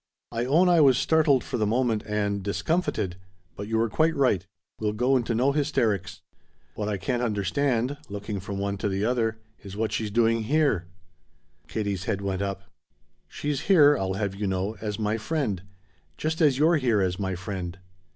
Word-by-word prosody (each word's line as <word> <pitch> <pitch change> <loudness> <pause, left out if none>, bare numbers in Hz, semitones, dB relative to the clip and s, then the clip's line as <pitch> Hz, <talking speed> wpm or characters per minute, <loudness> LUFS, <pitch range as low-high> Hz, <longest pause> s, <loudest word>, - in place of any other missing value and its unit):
"I 115 +1 -1
own 160 +8 +4
I 175 -2 +5
was 135 -4 +6
startled 150 -4 +3
for 125 - -3
the 105 - +1
moment, 115 -1 +1
and 100 -1 -1
discomfited. 100 - -1 0.4
But 100 - -6
you 110 +1 0
were 115 +1 +2
quite 160 +8 +1
right 105 -9 +2 0.3
we'll 105 -1 -1
go 125 +5 +2
into 120 -2 0
no 130 +5 +3
hysterics. 110 - 0 0.5
What 105 +3 -3
I 105 - -1
can't 120 +7 -2
understand" 120 +5 0
looking 100 0 -4
from 95 +1 -5
one 100 0 -2
to 105 - -1
the 95 +2 -1
other 115 -2 0 0.2
"is 100 0 -9
what 110 -1 -1
she's 105 0 -2
doing 115 +1 +2
here." 140 - +1 0.8
Katie's 100 +1 -3
head 100 - -1
went 100 -1 -2
up. 100 0 -3 0.6
"She's 145 -2 -3
here, 150 -6 +7
I'll 95 -6 -1
have 100 -1 -2
you 100 +1 -3
know, 95 +3 -1
as 105 -2 -3
my 110 0 -1
friend. 110 - -2 0.6
Just 160 +2 -2
as 145 -5 +4
you're 160 +3 +4
here 120 -7 +2
as 90 0 -1
my 95 -2 -2
friend." 90 0 -5
110 Hz, 180 wpm, -26 LUFS, 100-135 Hz, 0.8 s, here